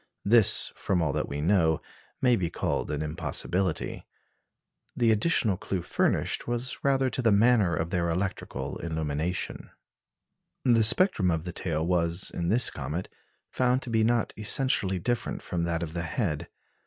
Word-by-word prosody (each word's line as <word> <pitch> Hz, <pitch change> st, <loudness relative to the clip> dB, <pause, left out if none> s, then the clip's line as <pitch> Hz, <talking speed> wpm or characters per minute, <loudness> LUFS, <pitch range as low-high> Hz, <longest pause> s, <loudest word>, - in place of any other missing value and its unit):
This, 105 Hz, 0 st, +6 dB
from 95 Hz, -, -1 dB
all 80 Hz, -4 st, 0 dB
that -, -, -2 dB
we 70 Hz, +1 st, -4 dB
know, 80 Hz, -2 st, +2 dB, 0.4 s
may 125 Hz, -2 st, +5 dB
be 90 Hz, -6 st, -1 dB
called -, -, -2 dB
an 75 Hz, 0 st, -2 dB
impossibility. 85 Hz, +3 st, -2 dB, 0.9 s
The 115 Hz, -2 st, +3 dB
additional 110 Hz, -, +2 dB
clue 95 Hz, -1 st, -4 dB
furnished -, -, 0 dB
was 120 Hz, +2 st, -3 dB
rather 135 Hz, -2 st, +2 dB
to 130 Hz, -, -2 dB
the 115 Hz, -3 st, +3 dB
manner 105 Hz, -3 st, +4 dB
of 80 Hz, +1 st, -3 dB
their 85 Hz, -2 st, 0 dB
electrical 90 Hz, +3 st, -3 dB
illumination. 80 Hz, +1 st, -3 dB, 1.0 s
The 120 Hz, -3 st, +4 dB
spectrum 110 Hz, -, +3 dB
of 80 Hz, -2 st, -1 dB
the 90 Hz, -1 st, -6 dB
tail 80 Hz, -3 st, -2 dB
was, 85 Hz, 0 st, 0 dB
in 85 Hz, -, -3 dB
this 115 Hz, +7 st, +2 dB
comet, 75 Hz, +6 st, -5 dB, 0.4 s
found 125 Hz, +1 st, +1 dB
to 120 Hz, -, -6 dB
be 110 Hz, -1 st, +2 dB
not 120 Hz, 0 st, +1 dB
essentially 105 Hz, -4 st, +2 dB
different 120 Hz, +6 st, -2 dB
from 85 Hz, -1 st, -2 dB
that 85 Hz, 0 st, -1 dB
of 80 Hz, -1 st, -6 dB
the 85 Hz, -, -2 dB
head. 85 Hz, -, -2 dB
95 Hz, 155 wpm, -27 LUFS, 85-115 Hz, 1.0 s, This